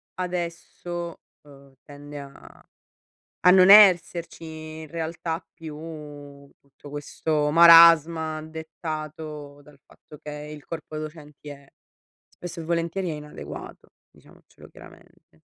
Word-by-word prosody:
adesso, 175 -1 -5 0.2
ehm, 140 -2 -18
tende 145 0 -11
a 140 -1 -14 0.8
a - - +9
non 185 0 +6
esserci 180 -5 +5 0.4
in - - -9
realtà 165 +1 -5
più 155 -2 -10 0.8
tutto 140 +1 -17
questo 150 +1 -2
marasma 165 -1 +7
dettato 155 -2 -8
dal 145 -1 -19
fatto 150 - -17
che 150 +1 -10 0.2
il 150 -1 -11
corpo 160 -2 -8
docenti 150 -1 -9
è 140 -1 -12 0.6
spesso 175 -1 -9
e - - -8
volentieri 170 +2 -2
è - - -4
inadeguato 150 0 -10 0.2
diciamocelo - - -20
chiaramente. - - -19
160 Hz, 110 wpm, -24 LUFS, 150-170 Hz, 0.8 s, a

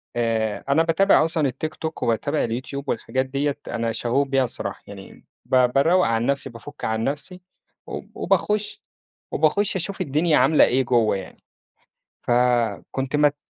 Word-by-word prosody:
آآ، 115 -3 -1
أنا 150 +4 +4
باتابع 165 +1 +4
أصلًا 160 -2 +1
التيك 145 +5 -4
توك 160 0 -5
وباتابع 115 -1 0
اليوتيوب 130 +4 -4
والحاجات 130 0 -1
ديّة 140 +2 -2
أنا 115 -1 -2
شغوف 120 +5 0
بيها 135 -1 +2
الصراحة 120 - -5
يعني، - - -12 0.2
ب - - 0 0.2
باروق 170 +7 +4
عن 115 0 0
نفسي 140 0 -1
بافُك 115 -2 -9
عن 110 0 -1
نفسي، 160 +8 -4 0.5
وب - - -7
وباخش 210 0 0 0.5
وباخش 195 +7 +1
أشوف 190 +2 -4
الدنيا 155 0 +2
عاملة 135 +5 +5
إيه 130 +2 +2
جوّه 120 -4 +2
يعني، 95 - -11 0.8
ف - - -3 0.6
كُنت 135 +2 -2
مت 145 -1 +3
140 Hz, 150 wpm, -23 LUFS, 120-160 Hz, 0.8 s, عاملة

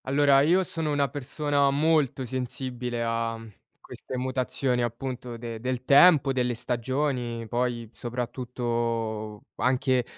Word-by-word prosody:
Allora, 140 0 +4
io 175 +6 +4
sono 160 -3 -2
una 140 -2 +1
persona 145 +1 0
molto 145 -2 +2
sensibile 125 -1 -4
a 115 0 -1
mhmm, 115 - -11 0.3
a - - -44
queste 130 - -8
mutazioni, 130 0 -1
appunto, 120 0 -4
de 115 -1 -6
del 125 +1 -3
tempo, 140 -1 +6
delle 125 -2 0
stagioni, 125 -1 -2
poi, 120 0 -1
soprattutto 115 -3 -3
anche 130 0 +2
125 Hz, 125 wpm, -27 LUFS, 120-140 Hz, 0.3 s, tempo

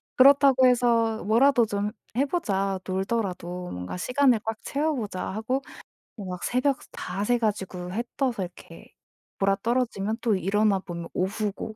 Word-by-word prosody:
그렇다고 270 -1 +6
해서 235 -3 +3
'뭐라도 240 +3 +4
좀 205 0 -2 0.3
해 270 - +4
보자. 195 - -1
놀더라도 185 -3 -2
뭔가 90 - -5
시간을 250 +3 +3
꽉 225 0 -1
채워 305 +3 -1
보자.' 205 -7 -4
하고 225 +7 -2 0.5
뭐 205 -4 -7
막 180 -1 -6
새벽 255 +2 +1
다 195 - -4
새 245 +2 +3
가지고 190 -5 -3
해 225 +6 -2
떠서 250 -8 0
이렇게 180 0 -12 0.5
곯아떨어지면 220 +1 0
또 225 -4 +2
일어나 200 +2 +2
보면 170 -2 -7
오후고 210 +3 -2
215 Hz, 300 characters per minute, -26 LUFS, 195-250 Hz, 0.5 s, 그렇다고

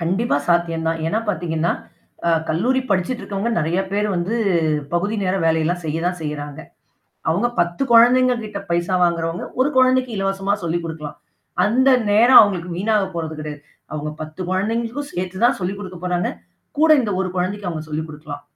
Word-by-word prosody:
கண்டிப்பா 185 +3 +1
சாத்தியந்தான். 165 -1 +1
ஏன்னா 190 +7 0
பாத்தீங்கன்னா, 170 -3 0 0.5
அ - - +4 0.2
கல்லூரி 240 +12 +1
படிச்சுட்ருக்கவங்க 200 +2 -1
நெறைய 170 +3 0
பேரு 205 +1 +1
வந்து, 175 +6 -1 0.6
பகுதி 200 +6 0
நேர 185 0 +1
வேலை 160 0 +3
எல்லாம் 175 +2 -1
செய்ய 155 0 -2
தான் 180 0 -1
செய்றாங்க. 145 -1 -5 0.7
அவுங்க 200 +9 +1
10 175 +7 0
கொழந்தைங்க 250 +2 +6
கிட்ட 210 -2 -6
பைசா 175 +2 +1
வாங்குறவங்க, 170 0 -1
1 275 +3 +3
கொழந்தைக்கு 255 -1 +3
இலவசமா 195 0 0
சொல்லிக் 170 0 -1
குடுக்கலாம். 155 -2 -7 0.5
அந்த 255 +5 +3 0.2
நேரம் 235 +5 +8
அவுங்களுக்கு 180 -5 +1
வீணாக 210 +2 +1
போறது 160 -2 -4
கிடையாது. 150 -1 -7 0.3
அவுங்க 150 0 -3
10 155 +3 -9
கொழந்தைங்களுக்கும் 230 +8 -2
சேர்த்து 185 +4 -2
தான் 245 - +3
சொல்லிக் 190 +2 -3
குடுக்கப் 185 -2 -8
போறாங்க. 180 -1 0 0.5
கூட 315 +1 +4
இந்த 215 - -2
1 190 - -1
கொழந்தைக்கு 185 +2 -2
அவுங்க 160 -2 -4
சொல்லிக் 155 +1 -3
குடுக்கலாம். 150 -1 -9
180 Hz, 160 wpm, -21 LUFS, 165-210 Hz, 0.7 s, நேரம்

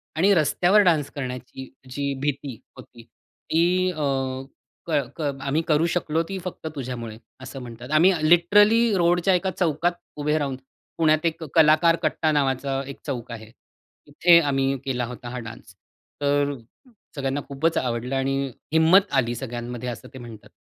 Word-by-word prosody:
आणि 190 +6 +4
रस्त्यावर 175 +5 +3
डान्स 160 -6 +2
करण्याची 130 -1 -7 0.2
जी 140 +1 -2
भीती 140 -2 -3 0.2
होती. 120 -1 -14
ती 175 +9 -1
अ, 155 -3 -6 0.9
क - - -5 0.3
क - - -6 0.2
आम्ही 140 +4 0
करू 155 0 +3
शकलो 165 -1 0
ती 195 - -4
फक्त 180 -3 -6
तुझ्यामुळे." 120 -5 -6 0.2
असं 130 +1 -8
म्हणतात. 120 +2 -10
"आम्ही 170 +5 +5 0.2
लिटरली 205 +7 +5
रोडच्या 175 +2 +3
एका 185 +1 -1
चौकात 170 0 +1 0.2
उभे 150 +1 0
राहून, 140 -3 -2 0.4
पुण्यात 155 0 +2
एक 165 0 -1
कलाकार 160 +1 +5
कट्टा 155 - +1
नावाचा 135 -1 0
एक 140 - -8
चौक 125 -5 -5
आहे, 110 -1 -9
तिथे 165 +6 +1
आम्ही 135 -3 0
केला 125 -2 -1
होता 120 +1 -8
हा 125 +1 -5
डान्स. 115 -4 -11 0.5
तर 145 0 +1 0.6
सगळ्यांना 140 0 -2
खूपच 145 +4 -1
आवडलं 125 +1 -2
आणि 135 0 0 0.4
हिंमत 170 +5 +5
आली 120 -1 -1
सगळ्यांमध्ये." 120 0 -5
असं 120 - -8
ते 130 - -9
म्हणतात. 115 -3 -11
145 Hz, 150 wpm, -24 LUFS, 125-165 Hz, 0.9 s, आम्ही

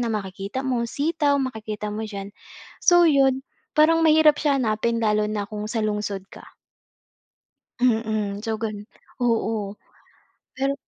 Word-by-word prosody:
na 235 -2 -1
makikita 195 +3 -4
mo, 245 -3 0
sitaw 290 +3 0
makikita 215 -5 -4
mo 220 +1 -4
diyan. 200 -2 -6 0.6
So 350 0 +6
yun, 270 -3 +3 0.4
parang 325 +2 +5
mahirap 310 -1 +6
siya 285 -2 +2
hanapin 230 0 0
lalo 215 -1 +2
na 210 -1 -2
kung 210 -1 -5
sa 225 +1 -2
lungsod 205 -2 -3
ka. - - -12 1.4
Mm. 220 -4 0
So 225 -1 -2
ganon, 210 -2 -5 0.4
oo. 220 -4 0 0.8
Pero. 270 +1 0
225 Hz, 130 wpm, -24 LUFS, 210-270 Hz, 1.4 s, So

